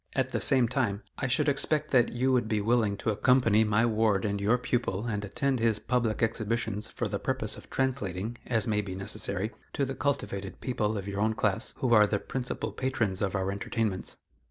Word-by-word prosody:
At 130 -1 0
the - - -1
same 130 -3 +4
time, 115 -4 -1 0.2
I 135 - 0
should 130 - +2
expect 150 +2 +1
that 120 -3 +4
you 130 +2 +1
would 125 -3 +2
be 110 -1 0
willing 110 -1 +1
to 110 - -1
accompany 110 -1 +4
my 105 +1 +3
ward 110 -3 +2
and 100 -1 -1
your 110 +5 +3
pupil 120 -4 -1
and 105 -3 -2
attend 130 +6 -1
his 115 -2 +2
public 120 -1 0
exhibitions 110 -1 -1
for - - -3
the - - -3
purpose - - -1
of - - -12
translating, 120 -5 -2
as 115 -3 +1
may 105 -3 +1
be 95 -2 -6
necessary, 100 +2 -1 0.2
to 140 - 0
the 135 - -4
cultivated 100 -10 -2
people 110 -4 -1
of 100 0 -5
your 100 0 -3
own 110 +1 +1
class 100 -3 0
who 125 -2 +1
are 105 -2 +7
the 105 - 0
principal 125 +4 -4
patrons 115 -7 -1
of 100 -1 0
our 95 0 0
entertainments." 100 0 -2
110 Hz, 205 wpm, -29 LUFS, 100-125 Hz, 0.2 s, are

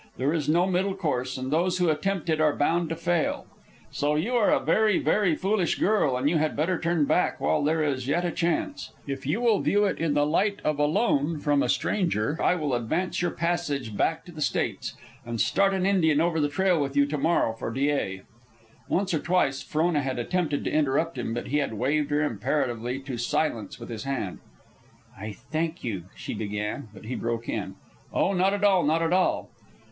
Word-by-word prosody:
There 135 +4 +1
is 150 -3 -1
no 170 +3 +4
middle 190 +1 0
course, 130 -9 -2
and 130 +1 -4
those 180 +4 +1
who 180 -2 +2
attempt 180 +3 -1
it 155 -1 +1
are 150 -2 +3
bound 165 +3 +1
to 165 - -2
fail. 170 0 0 0.5
So 145 +1 0
you 200 +12 -1
are 235 -4 +3
a - - +4
very, 215 -3 +3
very 195 -7 +2
foolish 190 +1 0
girl, 185 -11 +2
and 130 +3 0
you 160 +2 +2
had 155 0 0
better 165 +4 0
turn 170 -3 +1
back 180 - +1
while 150 - +1
there 155 +2 +1
is 135 -4 -1
yet 175 +5 +1
a 175 - 0
chance. 175 - -2
If 135 -1 -5
you 180 +11 0
will 230 -4 +3
view 205 +1 +2
it 195 - -1
in 160 -3 0
the 145 0 +3
light 200 +7 +1
of 150 -1 0
a 150 - +4
loan 160 -4 +1
from 145 -1 +2
a - - 0
stranger, 160 - 0
I - - +3
will 150 -6 -2
advance 160 +12 -1
your 175 - +1
passage 145 -10 -2
back 165 +9 0
to 175 - -11
the 155 -2 -9
States, 130 -5 -1 0.3
and 120 -1 -5
start 195 - +3
an 190 -1 0
Indian 165 -7 +3
over 165 0 +1
the 145 -1 +1
trail 180 +1 +2
with 140 -1 -2
you 140 - +5
to 145 +1 -3
morrow 155 -6 +2
for 115 - -5
Dyea." 135 -8 -1 0.7
Once 190 0 0
or 160 - +1
twice 170 -7 +1
Frona 155 -1 0
had 130 -2 -3
attempted 150 +4 -1
to - - -2
interrupt 155 +2 +1
him, 120 -2 -3
but 120 +1 -4
he 145 - +1
had 140 -6 -2
waved 145 +6 0
her 145 +1 +1
imperatively 120 0 -1
to 135 -3 -6
silence 120 -4 -1
with - - -9
his 115 0 -6
hand. 130 -9 -3 0.8
"I 105 +2 -6
thank 155 - -4
you," 100 -8 -4
she - - -6
began; 105 +4 -4
but 105 0 -13
he 125 - -4
broke 115 -1 -3
in, - - -3 0.4
"Oh, 200 - +1
not 190 +2 +2
at 205 - -4
all, 195 -3 +5
not 160 +3 +2
at 165 +1 +1
all." 185 0 +1
155 Hz, 215 wpm, -26 LUFS, 135-175 Hz, 0.8 s, you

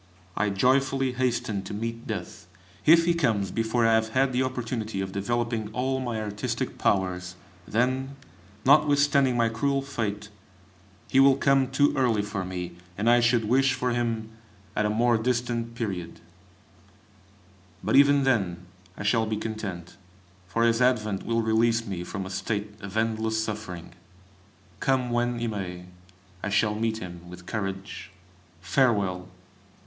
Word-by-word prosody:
I 105 0 +1
joyfully 130 +5 +2
hasten 120 -5 -1
to 95 +2 -7
meet 115 +2 -5
Death. - - -6 0.4
If 165 +1 +7
he 170 - +3
comes 110 - 0
before 115 +2 +1
I 115 - +4
have 110 0 +2
had 135 0 +3
the 125 - +1
opportunity 115 -5 -3
of 95 0 -3
developing 115 +2 -1
all 130 +2 -1
my 120 -4 -3
artistic 105 -1 -3
powers, 90 -2 0 0.3
then, 130 +4 0 0.5
notwithstanding 140 -2 +4
my 115 -1 +3
cruel 135 +5 0
fate, 105 -7 -4 0.8
he 135 - +3
will 135 0 +7
come 135 -1 +3
too 140 +2 +3
early 115 -6 +2
for 100 -2 -3
me, 90 -1 -6 0.2
and 105 +3 -1
I 120 +1 +6
should 115 -1 +2
wish 130 +4 +3
for 125 0 -1
him 115 -2 -2 0.4
at 105 - +1
a - - -1
more 115 +2 +2
distant 120 -1 -1
period; 95 -7 -4 1.6
but - - +1
even 140 0 +6
then 95 -9 0 0.3
I - - -5
shall 110 +2 +2
be 110 0 -1
content, 105 -6 -6 0.5
for 105 +6 0
his 115 +1 +3
advent 110 -6 +1
will 115 0 +1
release 115 +1 +2
me 95 -5 -4
from 95 +2 -5
a 95 - -7
state 105 +1 -3
of 100 +1 -6
endless 110 0 0
suffering. 105 -6 -6 0.9
Come 130 -2 +1
when 120 0 0
he 120 - -2
may, 90 -5 -4 0.6
I 100 - -2
shall 105 +1 +2
meet 110 +1 -1
him 90 -3 -9
with 90 0 -11
courage. 95 -1 -5 0.5
Farewell! 100 -8 +1
115 Hz, 150 wpm, -26 LUFS, 100-125 Hz, 1.6 s, If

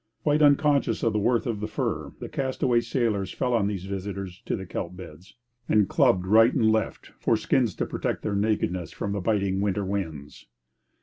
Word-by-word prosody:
Quite 150 0 +2
unconscious 145 -4 +3
of 115 - +2
the 105 - +1
worth 120 +3 +1
of 115 -4 -2
the 105 - -3
fur, - - -3
the - - -6
castaway 130 -2 0
sailors 115 -6 -1
fell 125 - -1
on 110 -4 +2
these 100 -3 -4
visitors 95 -1 -5
to - - 0
the 95 - -6
kelp 90 0 -5
beds 90 0 -12 0.3
and 105 -2 +4
clubbed 90 0 +3
right 115 +5 +6
and 110 -4 +3
left, 110 -2 -2
for 115 - +2
skins 115 -2 +1
to - - -1
protect - - -3
their 105 - -1
nakedness 100 -5 -1
from 100 - -4
the 100 -1 -2
biting 100 -2 0
winter 100 0 0
winds. 80 -7 -5
105 Hz, 190 wpm, -26 LUFS, 95-115 Hz, 0.3 s, right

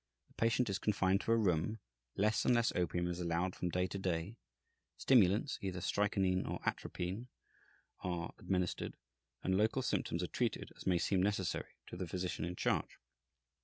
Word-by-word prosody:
The - - -24
patient 115 +2 +2
is 100 -1 -1
confined 95 -2 +2
to - - -1
a 115 - +5
room, 95 0 +1 0.4
less 105 +2 +2
and 125 - +4
less 115 -1 +3
opium 85 0 0
is 90 0 -3
allowed 90 +1 0
from 90 - -2
day 90 +1 +1
to 95 +2 -4
day, 90 +2 -1 0.6
stimulants 115 +2 +4
(either 95 -2 -3
strychnine 95 0 +1
or - - -3
atropine) 95 +8 -3 0.7
are 85 -2 -3
administered, 90 -2 -1 0.5
and 95 - +2
local 110 +6 +2
symptoms - - 0
are - - -1
treated - - -1
as - - -9
may 90 -2 +4
seem 95 +2 +2
necessary 95 -2 -1
to - - -9
the 90 -1 -3
physician 90 -1 -2
in 90 +1 -4
charge. - - 0
95 Hz, 165 wpm, -36 LUFS, 90-105 Hz, 0.7 s, a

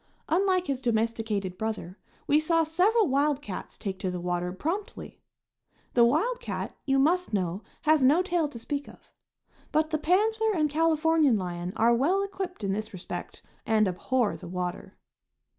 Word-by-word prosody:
Unlike 370 +1 +2
his 270 -4 -2
domesticated 220 -5 -1
brother, 210 -4 -4 0.3
we 295 +1 +4
saw 330 +1 +2
several 380 +7 +3
wild 280 +1 +2
cats 205 -10 -7
take 195 -3 -5
to 185 - -2
the 180 0 -4
water 180 0 -2
promptly. 335 - -5 0.7
The 240 - +5
wild 330 - +2
cat, - - -5
you 270 0 +3
must 330 +1 +2
know, 185 0 -1 0.2
has 310 -2 +4
no 300 +8 +5
tail 350 -4 0
to 280 - -10
speak 285 +4 -4
of. - - -18 0.6
But 310 +1 +1
the 310 - 0
panther 435 +7 +2
and 305 -3 +1
Californian 320 -4 +3
lion 175 -1 -4
are 230 +2 +4
well 340 +12 +2
equipped 380 - -5
in 195 -1 0
this 215 +2 -4
respect 185 -1 -7 0.2
and 215 -2 +3
abhor 220 +5 0
the - - -10
water. 180 +1 -5
275 Hz, 160 wpm, -27 LUFS, 205-330 Hz, 0.7 s, The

